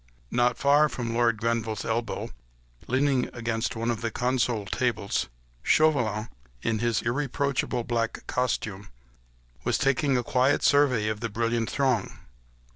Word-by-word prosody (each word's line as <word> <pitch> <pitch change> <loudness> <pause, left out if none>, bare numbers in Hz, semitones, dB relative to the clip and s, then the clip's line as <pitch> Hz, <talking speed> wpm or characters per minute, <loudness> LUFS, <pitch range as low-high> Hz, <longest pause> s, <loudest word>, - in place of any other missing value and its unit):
Not 120 0 +2
far 145 +2 +4
from 120 -2 -4
Lord 115 -1 +2
Grenville's 115 -1 -1
elbow, 115 -1 -2 0.6
leaning 130 0 +1
against 115 0 -2
one 115 +1 -1
of 115 -1 -4
the 115 - -1
console 120 -2 0
tables, 115 -2 -1 0.3
Chauvelin, 115 - +2 0.4
in 110 -1 0
his 115 0 0
irreproachable 135 0 -1
black 115 -1 -2
costume, 105 -5 -2 0.8
was - - +1
taking 135 0 +2
a 125 - 0
quiet 130 +3 +2
survey 135 -7 +4
of 110 -1 -2
the 115 0 -3
brilliant 115 +1 -1
throng. 130 -5 0
120 Hz, 130 wpm, -27 LUFS, 115-130 Hz, 0.8 s, far